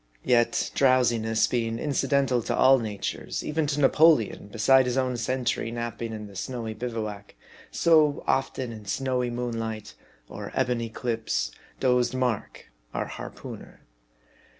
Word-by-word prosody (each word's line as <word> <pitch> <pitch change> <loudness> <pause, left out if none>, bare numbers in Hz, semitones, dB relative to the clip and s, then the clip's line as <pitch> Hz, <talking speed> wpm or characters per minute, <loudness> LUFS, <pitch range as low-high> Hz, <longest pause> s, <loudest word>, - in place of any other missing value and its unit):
Yet 120 -1 +2
drowsiness 120 -4 +3
being 115 -2 -1
incidental 135 -2 +1
to - - -2
all 135 0 +6
natures, 105 -3 -4
even 150 0 0
to 145 0 -1
Na 140 - +6
poleon, 150 -11 +3
beside 130 +4 +4
his 125 +1 -1
own 130 -1 +1
sentry 120 0 -1
napping 115 0 -4
in 105 -1 -6
the 100 -1 -12
snowy 115 +2 -4
bivouac; 110 -3 -5 0.3
so, 155 -3 +3
often, 130 -2 -1
in 110 -2 -10
snowy 125 +2 -1
moonlight, 115 -3 -4 0.3
or - - -8
ebon 125 -2 +1
eclipse, 115 - -2 0.3
dozed 125 -1 +2
Mark, 125 - -2 0.2
our - - -1
harpooneer. - - -9
120 Hz, 130 wpm, -26 LUFS, 115-130 Hz, 0.3 s, all